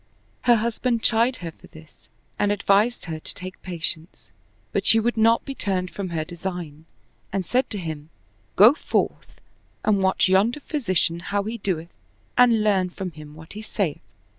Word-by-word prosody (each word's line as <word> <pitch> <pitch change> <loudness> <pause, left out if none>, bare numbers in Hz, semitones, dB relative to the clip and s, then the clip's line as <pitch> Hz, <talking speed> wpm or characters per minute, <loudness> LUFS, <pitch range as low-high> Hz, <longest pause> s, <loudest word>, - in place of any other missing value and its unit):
Her 240 -1 +7
husband 230 +1 0
chid 235 +3 +3
her 165 - -4
for - - -18
this 160 -1 -17 0.3
and 205 - +2
advised 205 +4 +2
her 160 -2 -5
to - - -1
take 185 0 -8
patience; 170 -2 -4 0.4
but - - 0
she 225 - +7
would 240 +2 0
not 225 +1 +3
be 275 - -4
turned 185 -7 -1
from 195 -2 -5
her 160 -2 -2
design 175 -3 -6 0.5
and 195 -2 -2
said 255 +7 +1
to 210 - -2
him, 160 -4 -6 0.2
" 100 +3 -38
Go 215 +7 +8
forth - - -2 0.5
and 205 -2 +3
watch 190 0 +3
yonder 210 +9 +3
physician 185 - 0
how 200 +3 -2
he 225 +3 -4
doth 170 -4 -2 0.5
and 235 -3 +5
learn 190 -4 +2
from 180 0 -6
him 150 -1 -12
what 160 +1 -12
he 210 - -7
saith." 195 -7 -2
190 Hz, 175 wpm, -24 LUFS, 170-225 Hz, 0.5 s, Go